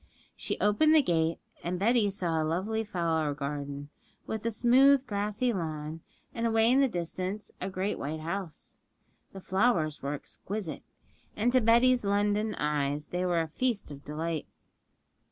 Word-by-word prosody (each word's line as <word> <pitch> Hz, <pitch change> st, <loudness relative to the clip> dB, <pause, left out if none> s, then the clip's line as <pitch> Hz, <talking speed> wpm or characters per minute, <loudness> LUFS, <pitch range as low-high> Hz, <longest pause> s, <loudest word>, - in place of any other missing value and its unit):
She -, -, -3 dB
opened 305 Hz, +10 st, +4 dB
the 305 Hz, -, +6 dB
gate, 165 Hz, -4 st, +1 dB, 0.3 s
and 180 Hz, +1 st, -2 dB
Betty 220 Hz, +2 st, +3 dB
saw 175 Hz, -5 st, -1 dB
a -, -, +1 dB
lovely 190 Hz, +8 st, -1 dB
flower 165 Hz, -7 st, -1 dB
garden, 145 Hz, 0 st, -5 dB, 0.3 s
with 220 Hz, -1 st, -4 dB
a -, -, +3 dB
smooth, 260 Hz, +4 st, +5 dB
grassy 210 Hz, +2 st, -1 dB
lawn, 160 Hz, -3 st, -4 dB, 0.3 s
and 230 Hz, 0 st, 0 dB
away 225 Hz, +1 st, +4 dB
in 265 Hz, -, +5 dB
the 275 Hz, -, +5 dB
distance 185 Hz, +1 st, -4 dB
a 185 Hz, -, -2 dB
great 190 Hz, +2 st, -2 dB
white 155 Hz, +3 st, -4 dB
house. 170 Hz, 0 st, -5 dB, 0.5 s
The 195 Hz, -, -9 dB
flowers 185 Hz, -6 st, +1 dB
were 140 Hz, +1 st, -2 dB
exquisite, 155 Hz, -, -6 dB, 0.5 s
and 230 Hz, +4 st, +2 dB
to 255 Hz, 0 st, +4 dB
Betty's 240 Hz, +2 st, +4 dB
London 205 Hz, +1 st, +1 dB
eyes 150 Hz, 0 st, -1 dB
they 180 Hz, +1 st, -1 dB
were 170 Hz, -2 st, +2 dB
a 160 Hz, -, -2 dB
feast 220 Hz, +2 st, -1 dB
of 140 Hz, 0 st, -10 dB
delight. 160 Hz, +1 st, -3 dB
190 Hz, 155 wpm, -29 LUFS, 155-220 Hz, 0.5 s, the